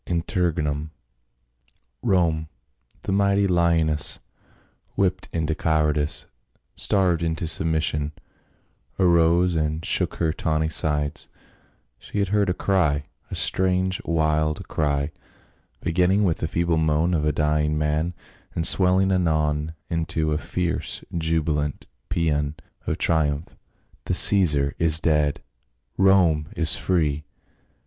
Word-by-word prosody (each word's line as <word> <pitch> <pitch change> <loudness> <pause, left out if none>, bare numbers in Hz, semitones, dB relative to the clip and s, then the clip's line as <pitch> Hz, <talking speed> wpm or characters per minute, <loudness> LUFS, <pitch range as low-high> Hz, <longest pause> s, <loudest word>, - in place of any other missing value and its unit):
INTERREGNUM. 80 -4 -1 1.1
ROME, 85 -7 +1 0.6
the - - -3
mighty 100 0 +2
honess, 85 -4 +1 0.8
whipped 95 -1 -1
into 80 -1 -1
cowardice, 75 -2 0 0.5
starved 90 -4 +1
into 80 0 -2
submission, 80 -2 0 0.9
arose 85 0 +3
and 80 0 -2
shook - - +1
her 80 -2 0
tawny 80 0 -1
sides; 75 -2 +1 0.7
she - - -8
had 100 -2 0
heard 100 -1 +1
a - - +2
cry, 80 -9 +1 0.3
a - - -5
strange 95 0 +1
wild 75 -1 0
cr}% 70 -1 -1 0.7
beginning 90 +4 +2
with 85 -5 +1
the 80 - -3
feeble 85 +1 0
moan 80 +2 +1
of 80 -3 0
a 75 - +2
dying 75 0 0
man, 75 +3 -1 0.4
and 80 - -1
swelling 95 +1 +3
anon 80 -3 0
into 80 -2 -1
a 75 - 0
fierce 90 0 -3
jubilant 80 -3 -1 0.2
paean 75 -4 -1 0.3
of - - -1
triumph. 75 -1 0 0.2
" - - -35
The - - -1
Caesar 75 -8 +5
is 80 -1 +5
dead! 75 -3 0 0.5
Rome 90 -6 +3
is 80 -2 +2
free 75 -5 0
80 Hz, 115 wpm, -23 LUFS, 75-90 Hz, 1.1 s, Caesar